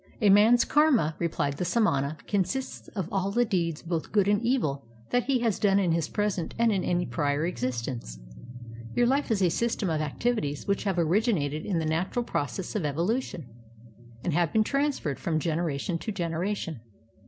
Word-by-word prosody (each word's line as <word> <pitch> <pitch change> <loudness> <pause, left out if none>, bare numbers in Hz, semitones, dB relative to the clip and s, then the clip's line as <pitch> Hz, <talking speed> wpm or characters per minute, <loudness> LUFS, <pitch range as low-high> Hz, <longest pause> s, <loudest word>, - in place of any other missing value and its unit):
"A 210 -3 +5
man's 220 +4 +6
karma'' 275 - +3
replied 145 -4 -1
the - - -1
samana, 155 -9 +1
"consists 205 +6 -2
of 190 -5 -2
all 195 0 0
the 240 +4 +2
deeds 170 -7 -1
both 170 -2 -3
good 200 -2 +3
and 205 +2 +2
e\'il 220 - 0 0.3
that 245 0 +2
he 260 -2 +1
has 225 -5 0
done 200 -2 +3
in 185 -4 +2
his 165 -1 +1
present 205 -5 -2
and 235 -1 +3
in 195 -3 0
any 175 0 0
prior 145 +5 0
existence. 120 - -3 0.8
Your 245 - +4
Uf 285 +1 0
e - - +3
is 195 - 0
a 180 - +4
system 225 -3 0
of 155 - 0
many 150 -2 -2
acti\ities 185 -12 -2
which 200 +1 0
have 195 -3 0
originated 170 - +1
in 190 -5 0
the 160 - 0
natural 175 +10 -1
process 170 +4 -3
of 205 - 0
evolution, 170 - -1 0.8
and 175 - -1
have 170 0 +2
been 220 - +3
transferred 275 - -1
from 160 -2 -1
generation 165 +1 -1
to 220 - -4
generation. 170 - -3
180 Hz, 185 wpm, -27 LUFS, 155-215 Hz, 0.8 s, man's